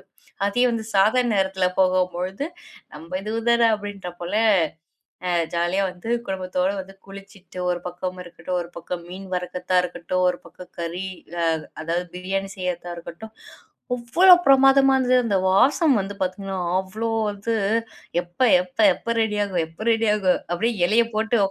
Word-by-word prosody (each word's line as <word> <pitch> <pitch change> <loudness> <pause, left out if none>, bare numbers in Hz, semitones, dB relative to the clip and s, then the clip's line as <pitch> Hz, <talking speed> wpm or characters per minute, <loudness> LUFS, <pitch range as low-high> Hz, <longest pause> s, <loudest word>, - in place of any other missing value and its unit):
தெரியும். - - -25 0.4
அதே 245 +5 +1
வந்து 225 -1 -3
சாதாரண 225 +4 +3
நேரத்தில 190 -1 +1
போகும்பொழுது, 185 +4 0 0.5
நம்ம 165 +5 -6
இது 215 +2 -4 0.2
தான 235 -1 +5
அப்டின்ற 205 -3 -7
போல 175 +4 -4 1.0
அ - - +1 0.2
ஜாலியா 175 +3 +1
வந்து 180 +5 -9 0.2
குடும்பத்தோட 185 -1 -1
வந்து 190 +1 -8
குளிச்சிட்டு, 195 -2 -13
ஒரு 175 0 0
பக்கம் 180 +1 -5
இருக்கட்டும், 175 +1 -5
ஒரு 170 - -8
பக்கம் 170 +1 -6
மீன் 190 +1 -8
வறுக்கதா 180 0 -2
இருக்கட்டும், 180 +1 -2
ஒரு 180 - -3
பக்கம் 180 +2 -13
கறி 170 +3 -4 0.4
ஆ - - +2 0.4
அதாவது 170 +2 -2
பிரியாணி 195 +2 -3
செய்றதா 175 -1 -4
இருக்கட்டும். 170 +6 -10 0.6
அவ்வளோ 335 +11 +6
பிரமாதமா 270 0 +6
இருந்தது. 255 -1 +3
அந்த 200 -4 +1
வாசம் 275 - +4
வந்து 200 +1 -6
பார்த்தீங்கன்னா, 190 +1 -3 0.2
அவ்வளோ 215 +4 -5 0.2
வந்து 205 +3 -3 0.7
எப்ப 175 0 -19 0.2
எப்ப 180 +2 -20 0.2
எப்ப 230 - -3
ரெடி 210 -1 0
ஆகும்? 180 -5 -1
எப்ப 165 +8 -9
ரெடி 225 0 +1
ஆகும்? 190 -3 +2
அப்டியே 225 +6 0
இலைய 225 +5 +4
போட்டு 225 +2 +1
190 Hz, 150 wpm, -23 LUFS, 180-220 Hz, 1.0 s, அவ்வளோ